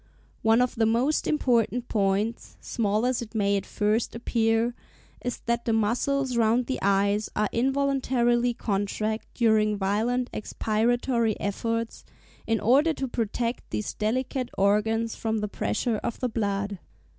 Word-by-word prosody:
One 225 +2 +4
of 250 - -1
the 225 -2 +2
most 245 +7 +1
important 245 -4 +1
points, 205 +2 -1
small 215 0 0
as 255 -1 0
it 230 -1 -9
may 200 -1 +2
at 195 - -2
first 215 +3 0
appear, 230 0 +1 0.5
is 245 -1 -3
that 235 0 -1
the 230 - +1
muscles 250 +5 +1
round 235 +2 +3
the 260 - -3
eyes 200 +2 +2
are 210 0 +1
involuntarily 250 -2 +1
contracted 215 +1 -2
during 215 -3 +3
violent 225 +6 0
expiratory 230 +1 0
efforts, 230 +3 -2 0.4
in 225 -1 +1
order 280 +9 +4
to 270 -2 -3
protect 235 0 -2
these 105 -1 -3
delicate 250 +3 -1
organs 220 +3 +2
from 220 -1 -2
the 210 0 -1
pressure 205 - -1
of 230 - -4
the 250 - -1
blood. 200 -3 -2
225 Hz, 140 wpm, -26 LUFS, 210-245 Hz, 0.5 s, One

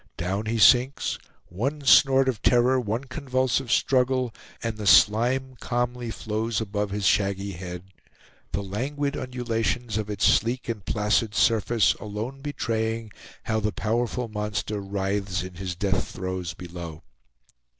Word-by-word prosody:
Down 95 +5 -2
he 115 +1 0
sinks; 125 +5 +4 0.3
one 135 - -3
snort 135 -1 +6
of 120 -5 -1
terror, 125 +1 +4
one 115 +1 -2
convulsive 130 -2 -1
struggle, 130 -2 +2 0.3
and 115 -1 -2
the 105 -2 -4
slime 120 - +4
calmly 120 0 -2
flows 110 0 -2
above 105 -1 -2
his 100 0 -3
shaggy 100 0 +1
head, 90 -1 -7 0.7
the 100 - -2
languid 140 +9 -2
undulations 115 -3 -2
of 105 -1 -4
its 105 0 0
sleek 120 +3 +2
and 115 -4 -4
placid 105 0 +1
surface 115 -3 +3
alone 110 +6 -5
betraying 115 -5 -2 0.3
how 110 - 0
the 105 0 0
powerful 120 +3 -1
monster 105 -1 -3
writhes 100 -1 -2
in 90 0 -8
his 90 0 -5
death 95 +1 0
throes 95 -2 -4
below. 85 -3 -8
110 Hz, 135 wpm, -25 LUFS, 100-125 Hz, 0.7 s, snort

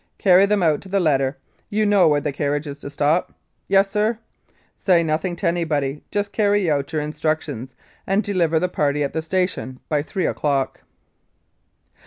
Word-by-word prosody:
"Carry 190 0 +5
them 205 -2 +1
out 155 -3 +2
to 195 - -12
the 195 +1 +1
letter 135 -5 +1 0.3
you 215 +1 +1
know 200 -4 +5
where 150 -1 +3
the 145 0 -2
carriage 145 +2 -1
is 145 -1 -7
to - - -7
stop?" 145 +4 0 0.3
"Yes, 195 0 +3
sir." 215 +2 +1 0.6
"Say 175 -3 +3
nothing 165 +3 -1
to 175 - -2
anybody, 150 -5 -1
just 205 0 -2
carry 205 -5 +2
out 140 -1 -1
your 155 -2 -1
instruc 155 +1 -1
tions, 130 -3 -8 0.3
and 195 +3 +2
deliver 170 -5 +1
the 180 - 0
party 150 -4 0
at 140 - -3
the 160 - -1
station 175 -6 -2
by 150 -2 +1
three 175 +4 -3
o'clock." 140 -3 -1
160 Hz, 180 wpm, -21 LUFS, 145-195 Hz, 0.6 s, Carry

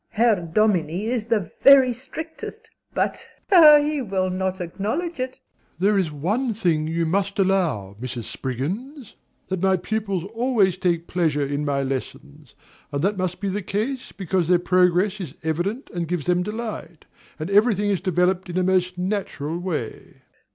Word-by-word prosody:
Herr 225 -1 +3
Dominie 175 0 0
is 230 -3 -2
the 210 -8 0
very 265 -2 +8
strictest 320 - -8 0.2
but - - -2 0.2
(playfully) 300 -5 +8
he 295 -2 -2
will 190 -5 -1
not 190 +1 -2
acknowledge 220 - -3
it. 255 0 -3
DOMINIE. - - -41
There 205 +3 +3
is 170 -5 -1
one 210 - -1
thing 165 -7 +1
you 165 +1 0
must 195 +4 -1
allow, 170 - +1
Mrs. 125 -2 -5
Spriggins, 195 - -5 0.4
that 190 -2 -2
my 190 0 +3
pupils 200 -2 -2
always 225 -6 +2
take 170 -2 0
pleasure 155 -6 0
in 145 +1 -2
my 140 -1 0
lessons; 130 - -6 0.4
and 140 +1 -2
that 200 0 +1
must 185 -1 -2
be 200 - -3
the 205 +2 -2
case 225 +8 -3
because 185 -3 -1
their 180 0 +5
progress 180 +3 +2
is 160 -5 -7
evident 175 - -2
and 170 -2 -2
gives 175 -3 -2
them 180 0 +2
delight, 210 -5 -6 0.3
and 155 +5 -5
every 210 +3 +5
thing 205 +1 0
is 195 - 0
developed 180 +1 +1
in 175 - -5
the 185 - +2
most 180 -1 +1
natural 180 -5 -3
way. 165 -11 -5
185 Hz, 165 wpm, -23 LUFS, 170-215 Hz, 0.4 s, very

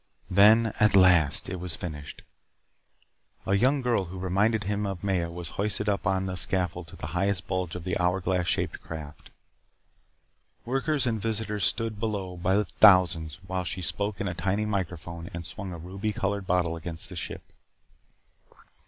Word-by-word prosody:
Then, 110 +4 +6
at 105 -1 +5
last, 85 -6 +5
it 95 - -4
was 90 -2 -2
finished. 75 -4 -7 1.2
A 95 - 0
young 130 +6 +2
girl 120 -6 +1
who 90 +2 -8
reminded 100 +4 +1
him 105 +1 -1
of 95 -2 -5
Maya 90 -4 0
was 85 -1 -6
hoisted 105 0 0
up 100 -3 0
on 95 0 +1
a 95 - -3
scaffold 90 -2 -2
to - - -12
the - - -7
highest 95 +1 0
bulge 90 -2 -2
of 90 - -6
the 90 -1 -2
hour 90 +1 +2
glass 90 -1 0
shaped - - -1
craft. 75 -2 -9 1.4
Workers 135 +3 0
and 110 -3 -1
visitors 105 -2 -1
stood 115 -2 -1
below 100 -5 -3
by 90 +2 +1
the 105 +1 +2
thousands 85 -7 +5
while 95 0 -2
she 90 +1 -4
spoke 100 +4 -1
into 100 -2 -1
a - - -5
tiny 100 +4 -1
microphone 85 -4 -4
and 85 -1 -6
swung 95 +3 -6
a 85 - -6
ruby 95 +6 -4
colored 100 -1 -2
bottle 85 -2 +1
against 80 0 -6
the - - -9
ship. - - -5
95 Hz, 170 wpm, -27 LUFS, 90-105 Hz, 1.4 s, Then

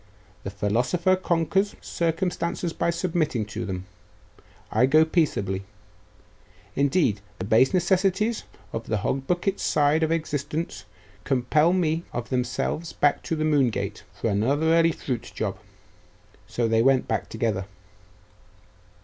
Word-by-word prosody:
'The - - -4
philosopher 120 - +1
conquers 185 +2 0
circumstances 170 0 -2
by - - 0
submitting 170 - 0
to 105 - -5
them. 95 -1 -4 0.9
I 125 - +4
go 155 +3 +5
peaceably. 100 - 0 1.1
Indeed, 140 - +2 0.2
the 95 - -4
base 115 +6 +4
necessities 190 +5 +1 0.3
of 115 0 -4
the 110 - 0
hog 135 0 -1
bucket 180 +3 0
side 150 +2 +2
of 160 0 +1
existence 155 - -3 0.4
compel 150 +5 +2
me 165 -3 +1
of 120 +1 -4
themselves 130 +6 -1
back 145 - +2
to 165 - -2
the 155 0 -1
Moon 145 -5 +3
gate, - - -4
for 115 - -2
another 140 +11 +2
early 165 0 +5
fruit 125 -6 -4
job.' - - -3 0.9
So 120 -1 0
they 115 0 +3
went 130 +1 +3
back - - -2
together. 110 -4 -1
150 Hz, 130 wpm, -25 LUFS, 120-170 Hz, 1.1 s, go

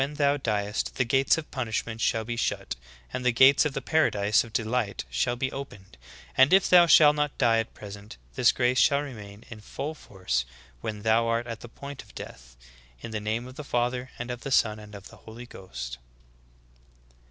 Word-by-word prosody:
thou 145 -1 +2
diest, 105 -6 -2
the 130 - +1
gates 135 +5 +3
of 160 - -7
punishment 115 -2 -3
shall 115 -1 +1
be 120 +1 -3
shut, 115 - -2 0.4
and 130 - -3
the 125 - +3
gates 130 +5 +6
of 150 - -1
the 135 - -4
paradise 105 -10 +2
of 115 - -12
delight 110 - -2
shall 90 - 0
be 130 +2 -2
opened; 100 - -9 0.4
and 130 +4 +5
if 190 0 +5
thou 175 -1 +7
shalt 150 -2 +7
not 150 -1 -1
die 115 -3 +3
at 115 - -4
present, 100 - -10 0.2
this - - +4
grace 125 +1 +1
shall 140 +1 +4
remain 105 -6 -10
in 110 -2 -9
full 145 +8 -5
force 90 - -3 0.4
when 105 +5 -5
thou 115 +1 +3
art 115 +1 0
at 115 -1 -6
the 120 - -11
point 140 +3 -9
of - - -20
death. - - -10 0.4
In - - -7
the 110 - -2
name 110 +3 -2
of 130 +2 -12
the 150 - -6
Father 125 0 -1
and 120 +1 -5
of 120 0 -6
the - - -5
Son 110 -5 +2
and 105 0 -12
of 100 0 -11
the - - -15
Holy 115 +2 -11
Ghost."'" 60 - -8
115 Hz, 200 wpm, -27 LUFS, 105-135 Hz, 0.4 s, thou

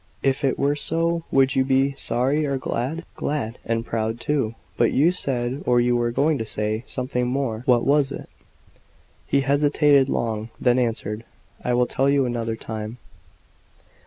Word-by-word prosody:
"If 135 +1 +1
it 135 - +1
were 140 +1 +1
so, 165 +2 0
would 135 -1 +3
you 135 - +4
be 135 +1 +2
sorry 135 +2 0
or 140 -1 0
glad?" 135 +6 -3
"Glad, 125 -6 -3
and 115 0 -1
proud 115 0 -2
too. 125 -5 -1 0.2
But 120 - +2
you 155 +6 +4
said, 130 -5 -2
or 125 -1 +4
you 120 0 +2
were 120 0 +1
going 145 +5 +1
to - - -1
say, 110 +1 -2
something 125 -1 -2
more. 125 -4 -1
What 120 -2 +4
was 140 -1 +3
it?" - - -7 1.0
He 140 - +2
hesitated 145 0 +3
long, 110 -2 -2
then 125 0 +3
answered: 115 -2 -2 0.4
"I 125 - +1
will 125 0 +3
tell 135 +3 +1
you 140 -1 +3
another 115 -2 -2
time." 110 +1 -6
130 Hz, 165 wpm, -23 LUFS, 115-140 Hz, 1.0 s, you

